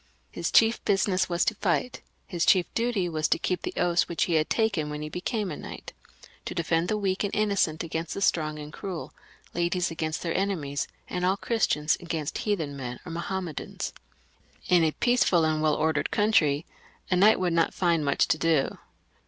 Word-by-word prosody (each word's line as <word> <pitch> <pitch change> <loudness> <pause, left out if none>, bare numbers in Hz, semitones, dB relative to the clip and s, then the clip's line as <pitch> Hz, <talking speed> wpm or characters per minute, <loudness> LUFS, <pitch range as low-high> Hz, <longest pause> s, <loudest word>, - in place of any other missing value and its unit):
His - - -2
chief 225 +1 +4
business 195 -2 +1
was 175 0 +1
to - - +2
fight; 180 - -1 0.2
his 175 -3 -2
chief 185 -3 +5
duty 230 -6 0
was 155 -2 0
to - - +2
keep 180 -2 -2
the - - -5
oaths 175 -1 +2
which 170 - 0
he 175 - 0
had 155 -1 +2
taken 200 -10 +1
when 150 0 -5
he 150 - -5
became 195 +4 -2
a - - -4
knight; - - -9 0.5
to - - -5
defend 165 0 +1
the 215 - 0
weak 195 -1 -1
and 200 - -1
innocent 200 -7 +1
against 165 0 -4
the 200 - -4
strong 155 -5 +1
and 150 +1 -8
cruel, 185 -4 -6 0.4
ladies 175 +1 0
against 160 -1 -3
their 165 - -2
enemies, 165 -8 -1 0.2
and 180 - -3
all 190 +2 +2
Christians 165 -10 +1
against 160 -4 -4
heathens 140 - -3
or 175 - -7
Mahom 185 +3 -3
medans. 155 -4 -5 0.7
In 175 -2 +5
a 160 - +3
peaceful 240 -9 +3
and 155 -1 +1
well 155 -1 +3
ordered 155 -1 0
country 170 -8 +2 0.5
a - - +4
knight 205 +4 +5
would 180 -2 0
not 165 0 +2
find 170 -4 +1
much 140 -1 +2
to 155 - +2
do. 160 -4 +1
170 Hz, 190 wpm, -27 LUFS, 155-190 Hz, 0.7 s, chief